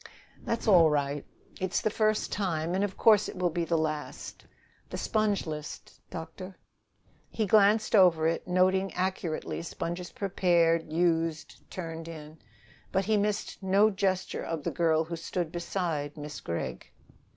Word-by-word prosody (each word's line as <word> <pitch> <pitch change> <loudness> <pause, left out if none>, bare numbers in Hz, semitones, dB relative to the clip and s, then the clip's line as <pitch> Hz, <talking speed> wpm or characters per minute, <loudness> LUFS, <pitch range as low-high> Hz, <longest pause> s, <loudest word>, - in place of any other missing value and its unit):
"That's 230 - -3
all 175 -6 +7
right. 145 -1 -1 0.4
It's 185 0 0
the 215 - 0
first 215 0 +1
time, 170 -4 -1
and 190 +2 +1
of 200 -2 -3
course 215 -3 +5
it - - -8
will 180 -1 +1
be 170 +1 -1
the 165 0 +1
last." 155 -1 -4 0.4
"The - - -5
sponge 215 -3 0
list, 150 -2 -7
doctor." 180 +3 -8 0.7
He 220 - -1
glanced 215 +2 +4
over 175 -5 +5
it, 165 +2 0
noting 185 +1 +2
accurately 180 -4 -2
sponges 170 +1 -5
prepared, 170 -4 +2
used, 165 -1 -1
turned 165 -2 -6
in. 155 -1 -10 0.5
But 190 0 +1
he 215 +1 +2
missed 205 0 -1
no 200 +3 +4
gesture 190 -2 -1
of 160 -3 -4
the - - -1
girl 160 -2 +2
who 170 +1 -5
stood 165 0 -3
beside 170 -4 -3
Miss 150 0 -7
Gregg. 65 -7 -4
175 Hz, 150 wpm, -29 LUFS, 160-195 Hz, 0.7 s, all